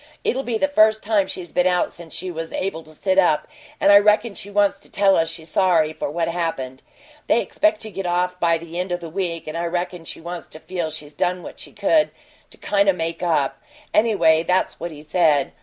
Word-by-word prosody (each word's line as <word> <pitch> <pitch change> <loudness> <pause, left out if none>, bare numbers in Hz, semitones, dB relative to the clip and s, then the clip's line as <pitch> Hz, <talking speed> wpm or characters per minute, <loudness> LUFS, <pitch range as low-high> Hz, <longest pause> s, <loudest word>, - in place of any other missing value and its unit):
It'll 260 - 0
be 240 -4 -2
the 285 - +2
first 215 -5 +4
time 205 -3 +2
she's 175 -3 -7
been 180 0 +2
out 180 -1 +1
since 170 -2 -11
she 185 0 -4
was 165 -1 -6
able 185 -4 -3
to 155 - -12
sit 190 +3 +2
up 165 -5 +3 0.3
and 200 - +5
I 200 - +9
reckon 210 +2 +3
she 200 - -9
wants 205 0 +2
to - - -19
tell 195 -1 +3
us 165 0 +1
she's 160 -1 -9
sorry 165 -4 +3
for 155 - -4
what 165 +2 -1
happened. 165 -7 -3 0.5
They 235 - +4
expect 210 0 +1
to 220 - -8
get 195 -2 -4
off 180 +1 0
by 170 -1 +3
the 170 +1 -7
end 180 0 -3
o' 175 - 0
the 170 -2 -8
week, 175 -2 -3
and 155 - -6
I 170 +1 -2
reckon 175 0 -3
she - - -8
wants 175 +1 -7
to 155 - -12
feel 175 -1 -4
she's 150 -1 -9
done 180 +3 -1
what - - -10
she - - -10
could 310 -2 +2 0.4
to - - -17
kind 200 -1 +2
o' - - +5
make 165 -1 -4
up. 160 -6 0 0.3
Anyway, 200 -8 +4
that's 180 +3 0
what 170 - -4
he 150 -2 -11
said. 150 -3 +2
175 Hz, 235 wpm, -22 LUFS, 165-195 Hz, 0.5 s, I